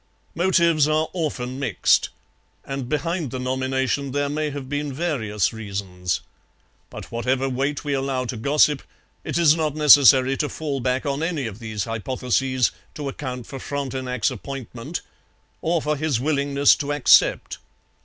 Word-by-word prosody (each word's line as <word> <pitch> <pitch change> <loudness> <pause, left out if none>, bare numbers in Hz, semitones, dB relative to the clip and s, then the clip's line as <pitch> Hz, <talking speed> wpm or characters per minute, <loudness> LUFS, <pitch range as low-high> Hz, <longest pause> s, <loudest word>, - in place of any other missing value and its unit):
Motives 170 -4 +3
are 155 +1 +1
often 135 -7 -3
mixed; 125 -9 +2 0.6
and 135 -2 -5
behind 160 +1 -1
the 130 - -5
nomination 130 +1 -1
there 145 0 0
may 150 +1 -1
have 140 -2 -6
been 145 +1 -3
various 125 - -1
reasons. 95 -5 -3 0.7
But - - -10
whatever 125 +3 0
weight 135 +3 -2
we 145 - -1
allow 135 -1 -1
to 125 - -4
gossip, 145 +4 +3 0.4
it - - -2
is 165 -3 +5
not 155 -3 -1
necessary 135 -3 +7
to 150 - -1
fall 145 -3 -3
back 125 +1 -1
on 140 +1 -1
any 165 -5 -1
of 110 -2 -6
these 110 -3 -4
hypotheses 125 +3 0 0.2
to 145 -2 -4
account 125 -3 -6
for 135 - -8
Frontenac's 130 -4 -2
appointment 135 +2 -6 0.6
or 165 -1 0
for 150 0 0
his 145 -4 0
willingness 140 0 +3
to 145 0 -3
accept. 145 -3 +4
135 Hz, 145 wpm, -23 LUFS, 125-150 Hz, 0.7 s, necessary